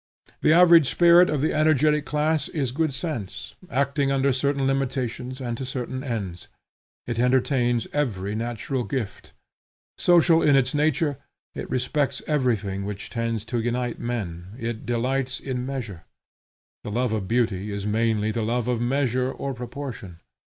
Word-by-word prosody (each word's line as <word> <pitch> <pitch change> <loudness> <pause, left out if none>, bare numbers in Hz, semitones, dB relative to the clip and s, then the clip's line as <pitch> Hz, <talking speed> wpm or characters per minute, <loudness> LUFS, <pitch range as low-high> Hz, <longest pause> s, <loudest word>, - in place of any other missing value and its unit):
The - - +4
average 170 -3 +7
spirit 175 +1 +6
of 150 -3 0
the 155 - +1
energetic 150 -1 +3
class 150 0 0
is 140 -8 -2
good 155 +3 0
sense, 125 - -5 0.2
acting 140 +1 +1
under 135 0 +2
certain 140 +1 0
limitations 130 -1 -2
and 120 -3 -3
to - - -3
certain 130 0 -4
ends. 100 -9 -4 0.6
It 120 -1 -3
entertains 125 -1 +2
every 105 -9 -1
natural 120 +3 -3
gift. 120 -7 -5 0.7
Social 170 -1 +5
in 145 -2 +4
its 125 -2 +2
nature, 150 -1 +1 0.3
it - - -6
respects 130 +3 -1
everything 110 -10 0
which 100 0 -6
tends 115 -2 -2
to 120 - +2
unite 120 +1 -2
men. 95 -5 -5
It 115 -2 -5
delights 130 +2 -1
in 125 -2 -4
measure. 115 -11 -5 0.8
The - - -5
love 120 +2 0
of 105 -4 -2
beauty 110 -4 0
is 100 0 -4
mainly 110 0 +1
the 115 - -2
love 115 +2 -1
of 120 -2 0
measure 130 0 +1
or 135 0 -4
proportion. 120 -7 -7
125 Hz, 150 wpm, -24 LUFS, 115-140 Hz, 0.8 s, average